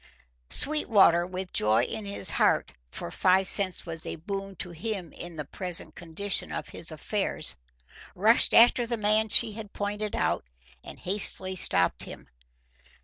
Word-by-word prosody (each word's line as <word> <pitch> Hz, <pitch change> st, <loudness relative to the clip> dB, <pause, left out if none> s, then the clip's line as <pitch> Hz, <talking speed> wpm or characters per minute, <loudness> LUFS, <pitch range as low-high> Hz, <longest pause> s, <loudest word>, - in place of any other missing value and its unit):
Sweetwater, 200 Hz, -, +3 dB
with 185 Hz, 0 st, -6 dB
joy 110 Hz, +2 st, +3 dB
in 220 Hz, -, -4 dB
his 200 Hz, 0 st, 0 dB
heart, -, -, +2 dB, 0.2 s
for 85 Hz, -, -7 dB
five 190 Hz, +1 st, +3 dB
cents 190 Hz, -1 st, +3 dB
was 165 Hz, -1 st, -7 dB
a -, -, -4 dB
boon 195 Hz, +4 st, -6 dB
to 175 Hz, 0 st, -5 dB
him 180 Hz, 0 st, -5 dB
in 175 Hz, -1 st, -9 dB
the 150 Hz, -2 st, -5 dB
present 170 Hz, 0 st, -4 dB
condition 175 Hz, -, -4 dB
of 75 Hz, 0 st, -5 dB
his -, -, -1 dB
affairs, -, -, -2 dB, 0.6 s
rushed 220 Hz, +5 st, +4 dB
after 240 Hz, +1 st, +6 dB
the 235 Hz, 0 st, -2 dB
man 215 Hz, +1 st, +2 dB
she 225 Hz, +1 st, +4 dB
had 210 Hz, -1 st, -9 dB
pointed 205 Hz, +1 st, -3 dB
out -, -, 0 dB, 0.4 s
and -, -, -10 dB
hastily 190 Hz, -1 st, -1 dB
stopped 90 Hz, -, +1 dB
him. -, -, -11 dB
190 Hz, 150 wpm, -27 LUFS, 170-210 Hz, 0.6 s, after